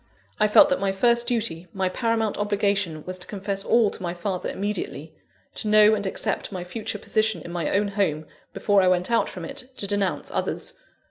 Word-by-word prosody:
I 215 Hz, -, +4 dB
felt 290 Hz, +8 st, +7 dB
that 275 Hz, -, +1 dB
my 195 Hz, -1 st, +1 dB
first 235 Hz, +4 st, +2 dB
duty, 225 Hz, -8 st, -1 dB
my 190 Hz, -1 st, 0 dB
paramount 225 Hz, +2 st, 0 dB
obligation, 200 Hz, -6 st, 0 dB
was 185 Hz, 0 st, -5 dB
to 180 Hz, -, -5 dB
confess 195 Hz, -1 st, -3 dB
all 230 Hz, -2 st, +3 dB
to -, -, -9 dB
my 175 Hz, -1 st, -3 dB
father 180 Hz, +1 st, -3 dB
immediately; 190 Hz, -6 st, -4 dB, 0.4 s
to -, -, -5 dB
know 215 Hz, 0 st, +6 dB
and 200 Hz, -2 st, -1 dB
accept 190 Hz, -, -3 dB
my 185 Hz, -2 st, -4 dB
future 210 Hz, +3 st, -5 dB
position 215 Hz, +1 st, 0 dB
in 170 Hz, -, -8 dB
my 170 Hz, -3 st, -2 dB
own 200 Hz, +1 st, +1 dB
home, 185 Hz, -7 st, 0 dB, 0.3 s
before 205 Hz, -2 st, +2 dB
I 185 Hz, -, +3 dB
went 180 Hz, +3 st, +2 dB
out 230 Hz, -, +2 dB
from 175 Hz, -3 st, -7 dB
it 250 Hz, -, -4 dB
to -, -, 0 dB
denounce 200 Hz, -1 st, -1 dB
others. -, -, -2 dB
200 Hz, 200 wpm, -24 LUFS, 185-215 Hz, 0.4 s, felt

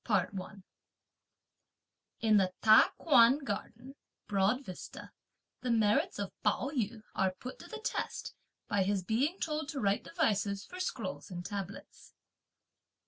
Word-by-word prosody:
CHAPTER 205 Hz, -2 st, +1 dB
XVII. 190 Hz, +1 st, -7 dB, 1.6 s
In 220 Hz, -2 st, +5 dB
the 185 Hz, -2 st, +3 dB
Ta 215 Hz, 0 st, +7 dB
Kuan 260 Hz, -4 st, +6 dB
Garden, 250 Hz, 0 st, -6 dB, 0.3 s
(Broad 205 Hz, +7 st, +1 dB
Vista,) 185 Hz, -, -9 dB, 0.5 s
the 255 Hz, -, -3 dB
merits 220 Hz, -3 st, +2 dB
of 200 Hz, -1 st, -3 dB
Pao 275 Hz, -, +1 dB
yü 225 Hz, -5 st, -2 dB
are 190 Hz, -1 st, +1 dB
put 255 Hz, -, -8 dB
to -, -, -11 dB
the 450 Hz, -, -7 dB
test, 440 Hz, -, -3 dB, 0.3 s
by 200 Hz, -, +1 dB
his 195 Hz, 0 st, +1 dB
being 270 Hz, -, 0 dB
told 305 Hz, -1 st, -2 dB
to 290 Hz, -, -3 dB
write 200 Hz, -2 st, +1 dB
devices 200 Hz, -, 0 dB
for 365 Hz, -, -10 dB
scrolls 185 Hz, -, -4 dB
and 175 Hz, -1 st, -6 dB
tablets. 200 Hz, -1 st, -7 dB
215 Hz, 140 wpm, -32 LUFS, 195-260 Hz, 1.6 s, Ta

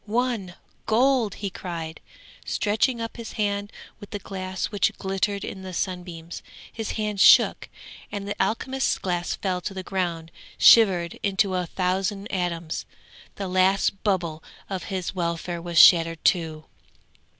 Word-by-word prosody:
won! 225 Hz, -5 st, -1 dB, 0.3 s
gold!" 240 Hz, -2 st, +2 dB
he 200 Hz, -2 st, -4 dB
cried, 165 Hz, -4 st, -6 dB, 0.4 s
stretching 225 Hz, +4 st, 0 dB
up 230 Hz, +1 st, -5 dB
his 230 Hz, -1 st, -7 dB
hand 205 Hz, -1 st, -1 dB, 0.3 s
with 205 Hz, -, -11 dB
the 205 Hz, -, -4 dB
glass 185 Hz, -1 st, -5 dB
which 205 Hz, -3 st, +2 dB
glittered 195 Hz, +1 st, -1 dB
in 190 Hz, -, -7 dB
the 185 Hz, -1 st, -8 dB
sunbeams: 175 Hz, -3 st, -5 dB, 0.3 s
his 225 Hz, -2 st, -4 dB
hand 210 Hz, -2 st, -2 dB
shook, -, -, +6 dB, 0.4 s
and 200 Hz, -1 st, -5 dB
the 205 Hz, -, -3 dB
alchemist's 260 Hz, +6 st, -1 dB
glass 175 Hz, -2 st, -2 dB
fell 185 Hz, -2 st, -2 dB
to 195 Hz, +3 st, -5 dB
the 190 Hz, -, -5 dB
ground 170 Hz, -4 st, -3 dB, 0.3 s
shivered 185 Hz, -7 st, +6 dB
into 195 Hz, -1 st, +1 dB
a 180 Hz, -1 st, -1 dB
thousand 190 Hz, +3 st, -1 dB
atoms. 170 Hz, -3 st, -3 dB, 0.5 s
The 195 Hz, -, -4 dB
last 190 Hz, +1 st, +2 dB
bubble 175 Hz, -6 st, -1 dB, 0.3 s
of 190 Hz, -2 st, -3 dB
his 185 Hz, -1 st, -3 dB
welfare 170 Hz, -1 st, -3 dB
was 170 Hz, 0 st, -4 dB
shattered 165 Hz, -1 st, +6 dB
too. 160 Hz, -3 st, +1 dB
190 Hz, 140 wpm, -25 LUFS, 175-205 Hz, 0.5 s, shook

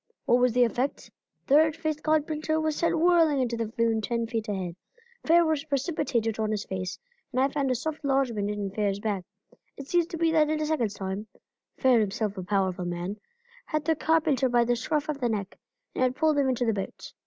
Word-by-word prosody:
What 240 Hz, -, +4 dB
was 250 Hz, -2 st, +3 dB
the 250 Hz, 0 st, +5 dB
effect? 245 Hz, +4 st, -2 dB, 0.3 s
The 280 Hz, -, +5 dB
red 315 Hz, 0 st, +4 dB
faced 310 Hz, -2 st, -3 dB
carpenter 310 Hz, 0 st, 0 dB
was 315 Hz, -1 st, 0 dB
sent 335 Hz, +1 st, +1 dB
whirling 330 Hz, -4 st, +4 dB
into 245 Hz, -2 st, 0 dB
the 230 Hz, -1 st, -2 dB
flume 230 Hz, -1 st, 0 dB
ten 235 Hz, +1 st, -1 dB
feet 225 Hz, -1 st, -3 dB
ahead. 185 Hz, -4 st, -3 dB, 0.5 s
Fair 340 Hz, +1 st, +6 dB
was 310 Hz, -3 st, 0 dB
precipitated 275 Hz, -, -1 dB
on 215 Hz, -1 st, 0 dB
his 215 Hz, -1 st, -2 dB
face, 185 Hz, 0 st, -4 dB, 0.3 s
and 255 Hz, -, -1 dB
I 270 Hz, +1 st, +3 dB
found 280 Hz, -1 st, -1 dB
a 255 Hz, -, +2 dB
soft 310 Hz, +5 st, -4 dB
lodgment 260 Hz, -7 st, +1 dB
on 205 Hz, -2 st, -3 dB
Fair's 200 Hz, -1 st, -1 dB
back. 205 Hz, -3 st, -2 dB, 0.5 s
It 275 Hz, -, -8 dB
seems 345 Hz, 0 st, +2 dB
to 335 Hz, -, -6 dB
me 330 Hz, 0 st, +2 dB
that 310 Hz, -2 st, +3 dB
in 310 Hz, 0 st, 0 dB
a 310 Hz, -, 0 dB
second's 240 Hz, -10 st, -1 dB
time 195 Hz, +2 st, -4 dB, 0.5 s
Fair 255 Hz, -3 st, +4 dB
himself 210 Hz, 0 st, -1 dB
a 185 Hz, -, -5 dB
powerful 185 Hz, -2 st, 0 dB
man 175 Hz, +3 st, -4 dB, 0.5 s
had 305 Hz, -1 st, -2 dB
the 320 Hz, -, +2 dB
carpenter 305 Hz, -4 st, +2 dB
by 240 Hz, -1 st, +4 dB
the 240 Hz, +1 st, +1 dB
scruff 295 Hz, +5 st, -1 dB
of 300 Hz, -2 st, -3 dB
the 245 Hz, -3 st, 0 dB
neck, 200 Hz, -3 st, -4 dB, 0.3 s
and -, -, -3 dB
had 255 Hz, 0 st, +2 dB
pulled 310 Hz, 0 st, +2 dB
him 270 Hz, -2 st, +2 dB
into 250 Hz, -1 st, 0 dB
the 225 Hz, -, +2 dB
boat. 195 Hz, -2 st, -6 dB
250 Hz, 215 wpm, -27 LUFS, 215-305 Hz, 0.5 s, Fair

